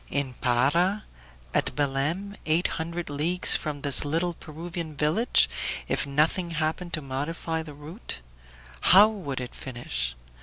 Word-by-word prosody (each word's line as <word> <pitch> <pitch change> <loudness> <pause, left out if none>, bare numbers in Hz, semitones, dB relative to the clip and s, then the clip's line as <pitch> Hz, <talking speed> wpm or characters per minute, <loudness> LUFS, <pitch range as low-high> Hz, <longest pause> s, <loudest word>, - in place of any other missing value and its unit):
In 140 -3 -2
Para, 145 - +1 0.5
at - - +1
Belem, 150 +8 -1
eight 160 +3 +2 0.2
hundred 170 +1 -4
leagues 160 +5 +5
from 150 -2 -3
this 140 -1 +3
little 165 +4 -1
Peruvian 165 0 -7
village, 160 - +3 0.4
if - - -1
nothing 155 +5 +1
happened 165 +2 -2
to 155 -2 -1
modify 160 +4 -3
the 150 -2 -10
route. 155 +9 -8 0.6
How 195 - +7
would 175 -12 -5
it 125 -1 -6
finish? 120 - -4
155 Hz, 130 wpm, -26 LUFS, 140-175 Hz, 0.6 s, How